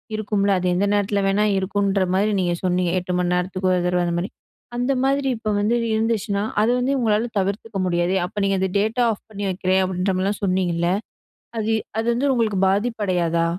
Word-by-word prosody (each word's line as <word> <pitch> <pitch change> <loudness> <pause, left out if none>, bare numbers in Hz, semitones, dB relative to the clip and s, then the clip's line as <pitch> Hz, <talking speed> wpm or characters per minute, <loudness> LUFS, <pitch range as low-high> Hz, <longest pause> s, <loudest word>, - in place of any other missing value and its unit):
இருக்கும்ல 205 -2 0
அது 180 - -1
எந்த 195 +3 +1
நேரத்துல 205 0 +1
வேணா 200 +2 +2
இருக்குன்ற 195 0 0
மாரி 205 +3 +2
நீங்க 175 -1 0
சொன்னீங்க, 180 -1 +1
8 180 0 -4
மணி 180 0 +1
நேரத்துக்கு 185 +1 -1
ஒரு 180 - +1
தடவை 180 0 +1
அந்த 170 0 -1
மாரி 185 - -3 0.5
அந்த 245 +3 0
மாரி 275 +1 +1
இப்போ 220 -1 -4
வந்து 210 +3 +1 0.2
இருந்துச்சுன்னா 220 -2 0 0.2
அது 220 +3 +3
வந்து 255 +3 0
உங்களால 220 -1 +1
தவிர்த்துக்க 200 +2 -3
முடியாதே. 175 +1 +1
அப்ப 205 +3 -6
நீங்க 195 0 +2
அந்த 190 0 0
டேட்டா 220 +4 +1
ஆஃப் 210 - -6
பண்ணி 205 -1 -6
வைக்குறேன் 185 0 +1
அப்படின்ற 185 +1 -1
மாரிலாம் 195 +2 -1
சொன்னீங்கல்ல 180 -3 +1 0.7
அது 220 0 0 0.3
அது 225 - -1
வந்து 275 +4 +1
உங்களுக்கு 220 -5 0
பாதிப்படையாதா? 190 -6 0
200 Hz, 180 wpm, -22 LUFS, 185-220 Hz, 0.7 s, அது